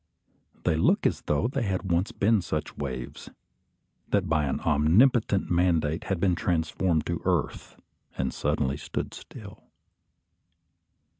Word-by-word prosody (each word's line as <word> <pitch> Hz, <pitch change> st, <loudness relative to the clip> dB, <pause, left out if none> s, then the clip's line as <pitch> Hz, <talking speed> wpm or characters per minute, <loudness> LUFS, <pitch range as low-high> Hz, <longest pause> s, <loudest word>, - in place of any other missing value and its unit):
They -, -, +2 dB
look 80 Hz, -, +2 dB
as -, -, +1 dB
though 75 Hz, +10 st, +1 dB
they 135 Hz, +2 st, -2 dB
had 95 Hz, -3 st, -2 dB
once 85 Hz, +4 st, +1 dB
been 105 Hz, 0 st, +2 dB
such 80 Hz, -3 st, -4 dB
waves, 65 Hz, -4 st, -6 dB, 0.8 s
that 100 Hz, -3 st, +1 dB
by 80 Hz, -2 st, +1 dB
an 70 Hz, -, -1 dB
omnipotent 95 Hz, -, +3 dB
mandate 85 Hz, -2 st, +1 dB
had 95 Hz, -3 st, -1 dB
been 95 Hz, 0 st, +2 dB
transformed 85 Hz, -1 st, 0 dB
to -, -, -3 dB
earth -, -, -1 dB, 0.4 s
and 65 Hz, -1 st, -1 dB
suddenly 70 Hz, -2 st, -1 dB
stood -, -, -5 dB
still. -, -, -11 dB
85 Hz, 130 wpm, -27 LUFS, 75-95 Hz, 0.8 s, omnipotent